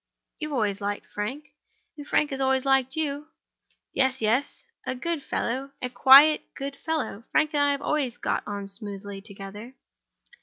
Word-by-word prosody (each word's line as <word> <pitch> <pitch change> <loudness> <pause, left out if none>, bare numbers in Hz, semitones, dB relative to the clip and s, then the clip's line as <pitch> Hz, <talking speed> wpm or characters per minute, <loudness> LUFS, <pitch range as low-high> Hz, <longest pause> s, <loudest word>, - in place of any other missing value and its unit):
"You 305 -1 -4
always 205 -5 0
liked 205 0 -3
Frank. 260 +9 -5 0.5
And 290 -1 -10
Frank 300 - +2
always 265 -1 +1
liked 270 0 +2
you." 300 -1 -2 0.7
"Yes, 265 -1 +1
yes—a 260 - -2
good 330 +4 -2
fellow; 270 +1 -3
a 250 - -3
quiet, 275 +5 +8
good 275 0 -5
fellow. 305 -10 -3
Frank 310 0 +2
and 290 - +2
I 285 0 +4
have 280 - -4
always 270 -6 -1
got - - -1
on 200 -1 -4
smoothly 200 -1 -6
together." 200 +5 -9
265 Hz, 150 wpm, -26 LUFS, 210-290 Hz, 0.7 s, quiet